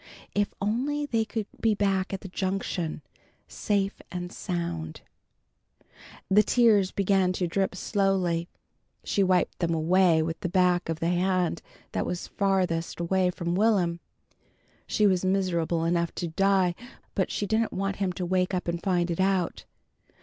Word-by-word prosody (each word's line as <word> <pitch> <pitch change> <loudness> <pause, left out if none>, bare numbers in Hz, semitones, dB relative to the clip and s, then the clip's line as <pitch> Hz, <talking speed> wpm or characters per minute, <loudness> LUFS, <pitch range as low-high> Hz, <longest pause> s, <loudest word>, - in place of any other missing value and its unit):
If 205 0 +1
only 265 +9 -1
they 230 -5 0
could 220 -1 -3
be 220 -2 +2
back 195 -2 0
at 195 - -4
the - - -7
Junction, 185 -4 -3 0.4
safe 200 -1 -1
and 180 0 -5
sound 85 - -4 1.3
The 205 +2 +6
tears 215 -3 +4
began 190 -2 +2
to 180 - -1
drip 190 +2 -1
slowly. 185 -4 0 0.5
She 200 - 0
wiped 185 -2 +2
them 170 -2 0
away 165 0 +3
with 165 +1 -4
the 180 - -3
back 180 -1 +2
of 165 0 -3
the 165 - +1
hand 180 -1 +1 0.3
that - - -2
was 175 - -4
farthest 185 -5 0
away 180 +2 +1
from 170 -1 -3
Will'm. 185 -4 +2 0.9
She 215 - +2
was 185 -3 +3
miserable 175 -3 0
enough 170 0 0
to 175 - -3
die, 190 +1 +2 0.4
but 190 - 0
she 205 - -2
didn't 220 +2 +1
want 195 +1 -2
him 195 -2 0
to 180 - -3
wake 185 +1 +1
up 180 - -3
and 170 0 -2
find 175 -2 +1
it 170 - -3
out. 190 -2 0
185 Hz, 155 wpm, -27 LUFS, 175-195 Hz, 1.3 s, The